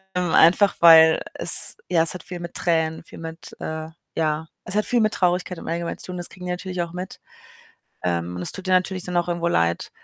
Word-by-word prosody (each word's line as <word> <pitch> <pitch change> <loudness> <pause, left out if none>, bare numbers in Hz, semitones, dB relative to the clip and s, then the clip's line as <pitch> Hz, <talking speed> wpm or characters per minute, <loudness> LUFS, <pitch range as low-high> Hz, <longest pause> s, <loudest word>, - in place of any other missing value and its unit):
Ähm, 180 -2 0
einfach 185 +4 +5
weil 160 -1 +8
es - - 0
ja, 170 -3 +3
es 165 - 0
hat 180 - -8
viel 180 -2 -7
mit 170 0 -7
Tränen, 160 -2 0
viel - - -14
mit, 165 0 -9
äh, 160 0 -5 0.3
ja 155 0 -1 0.2
es 185 - -4
hat 210 - +2
viel 240 -1 +2
mit 215 0 +2
Traurigkeit 180 0 0
im - - -10
allgemeinen 170 0 -3
zu - - -5
tun 180 -1 -6
das 175 - -3
kriegen 180 -1 -11
die 180 - -2
natürlich 180 0 -4
auch 170 0 -8
mit. 180 +1 -7 0.9
Ähm, 85 0 -1
und - - -5
das 90 - -1
tut 190 - -7
denen 185 - +5
natürlich 185 0 -1
dann 180 -1 -3
auch 175 - +1
irgendwo 170 0 -1
leid. 85 - 0
170 Hz, 235 wpm, -23 LUFS, 160-180 Hz, 0.9 s, weil